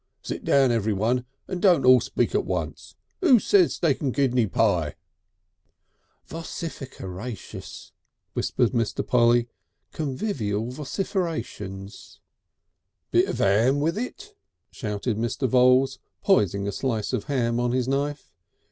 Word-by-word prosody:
Sit - - -5
down 135 -3 +4
everyone 115 +3 0 0.2
and 185 -2 -4
don't 175 -9 +4
all 130 0 +8
speak - - -1
at - - +2
once. - - -4 0.3
Who 300 -10 +6
says 370 - +3
steak 155 -6 0
and 140 -3 0
kidney 125 -4 +2
pie?..." 90 -8 +1 1.3
"Vocificeratious," 125 - -7 0.4
whispered 120 - 0
Mr. 115 -4 -1
Polly. 120 -1 +3 0.4
"Convivial 130 - -2
vocificerations." 140 - -4 0.9
"Bit - - +3
of - - -3
'am 115 +8 +3
with 160 +4 0
it," 400 - -6 0.4
shouted 105 -1 -3
Mr. 120 +4 -1
Voules, 130 +2 +4 0.2
poising 100 - +2
a - - -1
slice 115 -3 -2
of - - -1
ham 120 -5 0
on 120 0 +1
his 125 0 0
knife. 140 +2 -2
125 Hz, 120 wpm, -25 LUFS, 110-145 Hz, 1.3 s, all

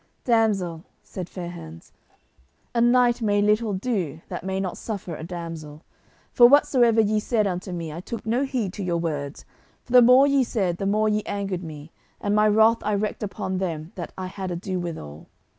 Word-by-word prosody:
"Damsel," 200 -8 +1 0.2
said 185 -2 -7
Fair 175 -2 -6
hands, 80 - -11 0.8
"a 235 - +1
knight 240 0 +4
may 205 -2 +2
little 210 +1 +2
do 185 - -2
that - - -5
may 190 0 -2
not 190 -2 -3
suffer 195 -6 -5
a 155 - -8
damsel, 165 -3 -7 0.5
for 240 - +7
whatsoever 245 -5 +4
ye 215 0 +3
said 215 0 0
unto 185 0 -3
me 165 -3 -5
I 165 - -6
took 220 +6 -7
no 235 +5 +1
heed 250 -9 -2
to 205 - -5
your 175 -2 0
words, 150 -4 -4 0.4
for - - -15
the 250 - +9
more 250 +3 +7
ye 280 -1 +3
said 190 -8 -1
the 195 - -2
more 215 +2 +2
ye 210 0 +1
angered 195 -3 -3
me, 155 -1 -9 0.3
and 205 - -1
my 210 0 +4
wrath 220 +2 +4
I 210 - -1
wreaked 205 +1 -2
upon 190 -2 -3
them 165 -3 -4
that 175 - -7
I 185 - -4
had 185 0 -5
ado 180 +1 -3
withal. 80 - -7
195 Hz, 190 wpm, -24 LUFS, 170-220 Hz, 0.8 s, the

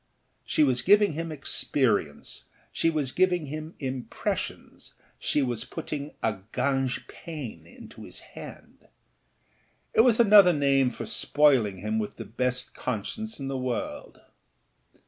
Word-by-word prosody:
She 155 - +2
was 130 -4 +2
giving 205 -2 +5
him 165 +2 -4
experience, 125 - -1 0.3
she 165 - +1
was 150 -5 -1
giving 180 -3 +2
him 155 +3 -6
impressions, 130 -3 -4 0.2
she 145 - +1
was 120 -3 -2
putting 145 0 -6
a 110 -3 0
gagnepain 135 - -3
into - - -12
his - - -6
hand. - - -11 1.1
It - - +6
was 235 -1 +4
another 205 -5 +8
name 140 -3 +3
for 125 - -7
spoiling 130 -10 +3
him 105 +4 -1
with 105 - -4
the - - -7
best 125 +2 -2
conscience 140 - -4
in 135 - -4
the 135 -1 -2
world. 125 -2 -4
135 Hz, 125 wpm, -27 LUFS, 125-160 Hz, 1.1 s, another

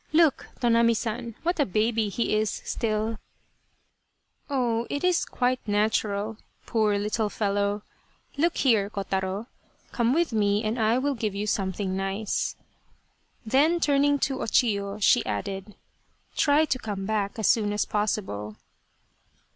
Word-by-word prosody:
Look, 315 -3 +3
Tonami 235 -1 +4
San, 230 0 -4
what 345 0 0
a - - +5
baby 215 +2 +1
he 220 +1 0
is 215 0 +1
still! 220 -1 -2 0.5
" - - -45
" - - -45
Oh, 240 -4 0
it 285 - -3
is 360 -1 +2
quite 250 0 0
natural, 210 0 0 0.3
poor 215 -3 +1
little 210 +1 -1
fellow. 205 0 -1 0.5
Look 330 +4 +1
here, 220 -7 +3
Kotaro! 195 0 -3 0.5
Come 235 -1 +1
with 325 -1 +1
me 205 0 +2
and 220 +3 -1
I 225 +2 +3
will 280 +2 0
give 215 -5 -3
you 205 +1 -2
something 195 -2 -1
nice." 195 +2 -2 0.9
Then, 295 +9 +3
turning 285 -2 +3
to 270 -1 0
O - - -1
Chiyo, 200 -3 +1
she 205 - +4
added 195 - -4 0.3
" - - -39
Try 295 +1 +4
to 265 -4 -1
come 200 -4 -4
back 205 -1 -1
as 220 - -2
soon 215 -3 +3
as 210 - 0
possible." 190 - -2
215 Hz, 145 wpm, -26 LUFS, 205-245 Hz, 0.9 s, a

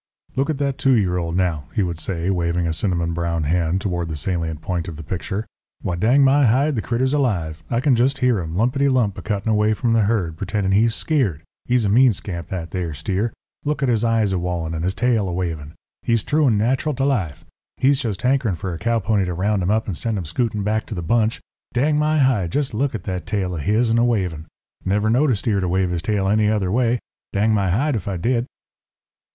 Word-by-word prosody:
"Look 135 +4 0
at 155 - 0
that 140 -1 -1
two 135 - +4
year 90 -5 +1
old, 85 -1 -2
now," 85 -6 0
he 105 - +2
would 85 -3 -3
say, 90 +1 -2
waving 85 -1 0
a 80 - 0
cinnamon 85 -2 -1
brown 85 -1 -1
hand 85 +4 +1
toward 85 -4 -2
the 80 - -3
salient 80 -1 -2
point 90 0 -3
of 85 - -6
the 80 - -7
picture. 95 +6 -4 0.4
"Why, 90 - -1
dang 120 +10 +4
my 135 0 +5
hide, 135 +6 +2
the 110 - -1
critter's 130 +4 0
alive. 85 - -1
I 115 - 0
can 140 -2 +3
jest 130 +4 +2
hear 125 -5 +2
him, 80 -1 -5
'lumpety 130 +6 +2
lump,' 120 -7 +1
a - - -7
cuttin' 105 0 -1
away 105 0 +2
from 115 +1 0
the 115 - +4
herd, 100 -7 0
pretendin' 100 +1 -1
he's 110 +3 +3
skeered. 110 - 0 0.2
He's 120 -2 +2
a - - +1
mean 120 +3 +5
scamp, 85 -3 -6
that 85 -3 -5
there 85 -5 -3
steer. 100 +8 -1 0.3
Look 150 -1 -1
at 135 - +2
his 115 -2 +1
eyes 115 -3 +2
a 90 - 0
wallin' 85 -2 -2
and 80 0 -3
his 95 +2 -1
tail 115 -4 +1
a - - -3
wavin'. 80 -4 -4 0.3
He's 115 -2 +1
true 150 -1 +2
and 110 -4 +3
nat'ral 130 +7 0
to 135 +1 0
life. 95 - -1 0.3
He's 135 +1 +3
jest 110 -6 -3
hankerin' 125 -6 +2
fur 90 +2 -4
a 80 - -6
cow 115 0 +1
pony 105 -2 +1
to 90 -1 -3
round 100 +3 0
him 90 - 0
up 110 +1 +1
and 95 - -3
send 115 +5 -2
him 90 - -4
scootin' 105 +5 -1
back 110 +1 -1
to 110 - -5
the 85 - -4
bunch. 115 +4 +1 0.3
Dang 150 +4 +2
my 155 +1 +2
hide! 125 - +2
jest 145 -4 0
look 130 +3 0
at 100 - -5
that 90 -3 -4
tail 95 -3 -1
of 80 - -3
his'n 115 +5 +2
a - - +4
wavin'. 90 -9 -1 0.4
Never 105 +3 +1
knowed 140 +6 +3
a 125 - +3
steer 100 0 0
to 95 - -1
wave 95 0 +1
his 85 -2 -2
tail 100 0 0
any 105 +1 +3
other 100 -4 0
way, 120 +2 +2 0.4
dang 105 +2 +2
my 100 -3 +1
hide 130 - +1
ef 105 -4 -4
I 95 -2 -2
did." 120 +7 0
105 Hz, 240 wpm, -21 LUFS, 90-120 Hz, 0.4 s, my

